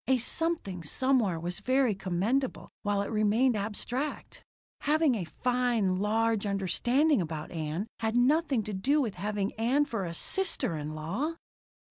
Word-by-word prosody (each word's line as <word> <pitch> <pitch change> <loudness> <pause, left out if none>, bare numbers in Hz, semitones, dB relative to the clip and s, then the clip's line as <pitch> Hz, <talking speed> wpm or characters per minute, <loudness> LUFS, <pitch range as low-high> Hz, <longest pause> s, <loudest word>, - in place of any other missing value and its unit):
A 265 0 +4
something 250 - 0
somewhere 220 - +1
was 175 +2 -4
very 255 -3 +2
commendable 195 +8 -1
while 205 -1 0
it 200 - -5
remained 220 +4 +3
abstract! 225 +7 -3 0.4
Having 305 -1 +3
a 200 -7 -2
fine 245 -4 0
large 220 +1 +1
understanding 240 - +2
about 155 -2 -5
Ann 160 +3 -3
had 225 +1 0
nothing 270 -1 +3
to 210 - -5
do 270 +11 +2
with 235 -8 0
having 205 0 -2
Ann 265 +6 +3
for 225 -9 -3
a 170 -1 -5
sister 335 - +1
in 150 0 -5
law! 205 - -2
220 Hz, 145 wpm, -29 LUFS, 190-265 Hz, 0.4 s, A